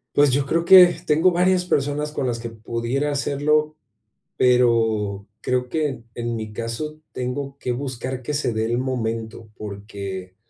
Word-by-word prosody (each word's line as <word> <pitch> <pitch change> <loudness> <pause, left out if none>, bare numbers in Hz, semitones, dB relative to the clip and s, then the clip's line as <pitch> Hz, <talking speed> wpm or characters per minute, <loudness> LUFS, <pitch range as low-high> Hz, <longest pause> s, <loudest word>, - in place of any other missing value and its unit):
pues, 145 -1 +5
yo 135 +2 +1
creo 165 +4 +1
que 185 +1 +10 0.2
tengo 160 +5 +4
varias 180 +1 +2
personas 150 -1 -1
con 135 - -2
las 120 -2 -1
que 115 0 -5
pudiera 115 +5 -2
hacerlo, 150 +2 +1 0.6
pero, 115 -5 +2
creo 125 0 -1
que 150 -6 -1
en 120 0 -3
mi 110 -1 -6
caso 115 +8 -5
tengo 135 +2 -4
que 125 - -2
buscar 130 0 -4
que 140 +4 -4
se 140 -4 0
dé 110 0 -1
el 120 +1 0
momento, 115 -3 -3
porque 100 -3 -7
125 Hz, 155 wpm, -22 LUFS, 115-145 Hz, 0.6 s, que